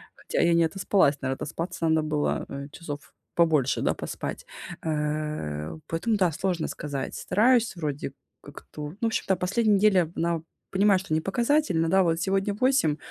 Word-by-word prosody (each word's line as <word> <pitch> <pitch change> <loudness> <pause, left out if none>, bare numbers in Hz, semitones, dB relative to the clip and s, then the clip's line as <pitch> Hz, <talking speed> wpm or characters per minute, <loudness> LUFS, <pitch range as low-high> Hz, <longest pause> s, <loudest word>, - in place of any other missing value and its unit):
Хотя - - -2
я 170 0 +4
не 170 - +4
отоспалась, 165 -4 +2
наверно 130 - -1
отоспаться 165 +4 -3
надо 160 0 +3
было, 150 -1 0
э, 140 0 -6
часов 145 -3 -8 0.2
побольше, 155 -6 +3
да, - - +2
поспать. - - -5 0.4
Э, 150 - -2
поэтому 215 +7 0
да, 185 -4 +2
сложно 170 +1 -1
сказать. 145 -3 -4
Стараюсь 230 +3 +2
вроде 150 -4 -4 0.3
как-то. 150 -1 -9
Ну, 180 - -16
в - - +1
общем-то, 195 -3 0
последняя 205 +4 +2
неделя, 190 -5 +3
она 170 -1 0 0.3
понимаю, 195 0 +4
что 185 -4 -4
не 160 - +2
показательная, 200 - +1
да, 190 +2 +4
вот 165 -2 +1
сегодня 195 +3 0
8, 235 - +2
170 Hz, 160 wpm, -26 LUFS, 150-195 Hz, 0.4 s, я